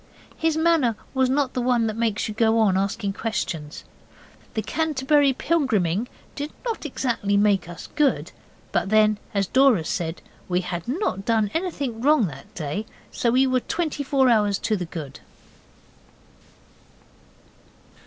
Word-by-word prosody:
His 320 -1 0
manner 320 -8 +3 0.2
was 260 -1 +2
not 270 -1 +1
the 250 - -1
one 240 -2 +2
that 220 -1 -2
makes 225 -2 0
you 215 - -4
go 225 +1 +2
on 210 -4 +3
asking 200 +1 -1
questions. 170 -8 -4 0.7
The 220 - -1
Canterbury 290 +1 +2
Pilgriming 240 - 0 0.3
did 290 +1 -5
not 455 -9 -3
exactly 230 -7 0
make 200 -4 +2
us 175 - -8
good, 295 -3 +1 0.4
but - - 0
then, 215 -1 +4 0.2
as 200 -1 +2
Dora 255 -6 +4
said, 165 -1 -3 0.3
we 180 0 +1
had 175 -1 -5
not 255 - -1
done 220 -2 +1
anything 285 -10 -3
wrong 290 -3 +4
that 145 +9 -12
day. 170 +7 -4 0.2
So 235 - 0
we 255 +3 +4
were 255 -1 +2
twenty 320 +1 -2
four 270 -1 +3
hours 210 -4 +3
to 220 - 0
the 180 -3 -3
good. 155 -5 -8
225 Hz, 145 wpm, -24 LUFS, 200-275 Hz, 0.7 s, then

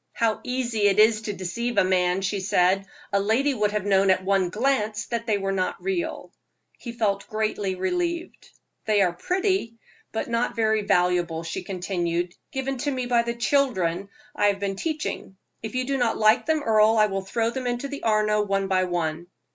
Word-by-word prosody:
"How 225 -2 0
easy 240 -5 0
it 195 - +2
is 215 0 +5
to 215 -1 -4
deceive 230 +6 -3
a - - +6
man," 185 0 +1
she 200 +1 -1
said; 190 0 +2 0.3
"a 200 - +4
lady 230 +8 +2
would 210 -4 0
have 210 -2 -2
known 195 -1 +3
at 185 0 +2
one 195 -2 +2
glance 215 -1 0
that 235 0 -4
they 215 -2 +2
were 195 -1 -2
not 185 -1 -1
real." 355 -4 -3 0.5
He 235 - -7
felt 205 -4 -1
greatly 215 -3 -2
relieved. 340 - -3 0.4
"They 210 -2 +3
are 175 -2 +1
pretty, 365 - -1 0.3
but 220 - -3
not 235 +1 -1
very 220 -1 +2
valuable," 175 -4 +1
she 165 +2 -4
continued 175 -2 -2 0.2
"given 265 -2 -3
to 290 - -1
me 255 -3 -2
by 240 -1 +3
the 235 0 -3
children 200 -9 0 0.3
I 205 - +3
have 200 -1 +1
been 195 -1 -2
teaching. 300 - -4 0.2
If 220 +1 -6
you 255 0 0
do 275 0 -1
not 235 -2 +1
like 215 +4 +4
them, 315 -2 +1
Earle, 220 -1 +4
I 215 - +6
will 195 -2 -2
throw 225 +4 -1
them 255 0 -4
into 245 +3 -2
the 285 0 -7
Arno 215 -1 +2
one 195 -1 0
by 185 -1 +2
one." 170 -1 -2
215 Hz, 195 wpm, -25 LUFS, 190-240 Hz, 0.5 s, a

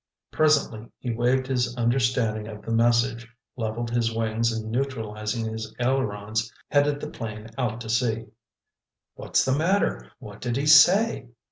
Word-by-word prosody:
Presently 145 -8 +2
he 125 - -4
waved 125 +3 +1
his 125 -2 -1
understanding 120 -3 +1
of 105 -1 -9
the 115 - -5
message, 115 0 +1 0.2
leveled 115 0 -3
his 115 -1 +1
wings 115 +1 0
and 110 -1 -4
neutralizing 110 -3 -3
his 110 0 -6
ailerons, 110 -4 -1 0.2
headed 145 0 +2
the 150 - -5
plane 110 -1 -7
out 120 -4 -2
to 110 - -7
sea. 115 -1 0 0.9
"What's - - 0
the 130 - +2
matter? 185 +7 0
What 105 -5 -12
did 120 0 -2
he 140 - -1
say?" 160 - +6
115 Hz, 145 wpm, -25 LUFS, 110-130 Hz, 0.9 s, say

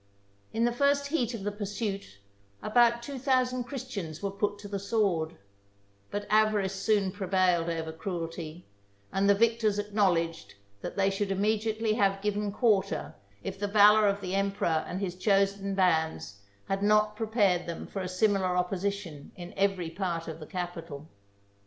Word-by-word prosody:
In 230 +1 +1
the 240 - +2
first 280 +3 +2
heat 250 -6 0
of 205 - -7
the 205 - -1
pursuit, 200 - -4 0.5
about 235 +1 +3
two 275 +1 -6
thousand 255 -1 +1
Christians 210 - -6
were 200 - -1
put 205 +1 -1
to 205 0 -9
the 200 -1 -3
sword; 195 -6 0 0.7
but 205 0 -4
avarice 210 -2 +2
soon 195 -1 +1
prevailed 185 -3 +1
over 160 -1 -3
cruelty; 165 -1 -5 0.5
and 195 +1 +2
the 200 - +6
victors 225 -1 +2
acknowledged 190 - 0 0.3
that - - -6
they 195 0 +3
should 195 +1 -2
immediately 215 +2 0
have 195 -3 +2
given 210 0 -1
quarter 205 -3 +1 0.3
if - - -5
the 205 - -1
valour 210 +1 +6
of 200 0 0
the 185 -1 -4
emperor 195 -5 +1
and 185 - -4
his 185 -3 -2
chosen 195 +1 +1
bands 160 - +1 0.3
had 195 0 -1
not 210 +1 +3
prepared 210 -6 +1
them 170 - -5
for 195 - -5
a 185 - -3
similar 185 -1 +1
opposition 180 -4 -3
in 175 0 -9
every 195 -4 0
part 170 -2 -3
of 160 0 -6
the 155 - -9
capital. 165 -5 -6
200 Hz, 160 wpm, -29 LUFS, 180-215 Hz, 0.7 s, the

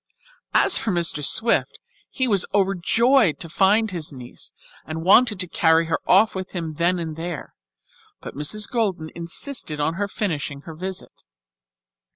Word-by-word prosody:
As - - +4
for 225 - -3
Mr. 170 -5 0
Swift, 230 +10 +3 0.3
he 260 -2 -2
was 200 -5 +2
overjoyed 200 - +2
to 165 - -4
find 205 +5 +2
his 165 -4 -2
niece 125 -3 -9 0.3
and 160 +2 -6
wanted 210 +2 +5
to 180 - 0
carry 165 -1 +2
her 165 - -1
off 200 +4 +4
with 190 0 -6
him 165 -4 -4
then 175 +2 +1
and 160 -2 -5
there, 165 -1 -6 0.7
but - - -9
Mrs. 200 +9 0
Golden 190 -10 -2
insisted 170 - -2
on 150 +2 0
her 205 - 0
finishing 150 -9 -4
her 160 - -10
visit. 185 +3 -7
175 Hz, 155 wpm, -22 LUFS, 160-205 Hz, 0.7 s, wanted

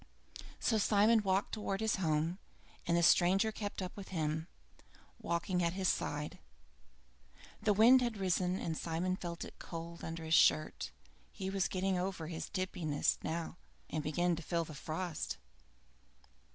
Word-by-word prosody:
So 220 -2 +2
Simon 215 +2 +4
walked 195 -1 +1
towards 210 -2 -2
his 220 - +2
home, 165 +1 0 0.5
and 170 0 +3
the 170 - +3
stranger 190 +6 +5
kept 205 -2 -4
up 180 - -6
with 200 -2 -8
him, 160 -2 -2 0.7
walking 175 +2 0
at 170 0 +1
his 190 -1 +1
side. 150 +1 -2 1.2
The 210 0 +3
wind 235 +5 +7
had 235 -3 -1
risen 185 -1 +1
and 165 -3 -3
Simon 170 +3 -1
felt 170 -2 -5
it - - -13
cold 170 0 -7
under 165 0 -5
his 160 - -1
shirt. 155 -1 +4 0.4
He 190 0 -4
was 195 -2 +1
getting 190 0 0
over 180 -3 -3
his 165 -2 -5
tipsiness 180 -6 0
by - - -3
now, 165 +1 -3 0.3
and 155 - -1
began 175 +3 +1
to 165 - -6
feel 170 +1 -1
the 155 - -9
frost. 160 +3 -4
180 Hz, 155 wpm, -34 LUFS, 165-195 Hz, 1.2 s, wind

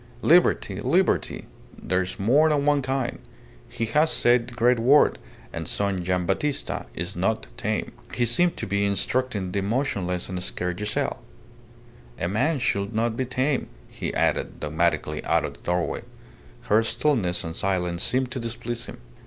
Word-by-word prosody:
Liberty, 155 - +4
liberty. 170 +9 +1 0.3
There's 90 0 -2
more 140 +10 +4
than 145 -2 +1
one 145 -1 +3
kind! 130 -1 -2 0.5
He 115 - -2
has 150 +8 +2
said 120 -1 +3
the 120 - -10
great 120 0 +3
word, 135 +6 +5 0.3
and - - -4
son 100 -3 -1
Gian' 90 0 0
Battista 140 +10 -1
is 90 +3 -2
not 100 +5 0
tame." 110 -3 -2 0.2
He 120 - +1
seemed 170 +10 +2
to - - -3
be 100 +1 0
instructing 100 0 0
the 100 - -1
motionless 100 -5 -1
and 90 -1 -4
scared 90 -1 -3
Giselle.... 105 +1 -2 1.0
"A - - 0
man 140 - +1
should 100 -4 -1
not 115 0 +1
be 130 - -1
tame," 130 +2 0 0.2
he - - -4
added, - - 0
dogmatically 75 0 0
out - - +2
of - - -5
the - - -19
doorway. 90 0 -1 0.6
Her 105 +2 +3
stillness 110 -7 0
and 80 0 -5
silence 90 -2 -1
seemed 130 0 +1
to 130 - -3
displease 120 0 -4
him. - - -9
110 Hz, 160 wpm, -25 LUFS, 95-130 Hz, 1.0 s, word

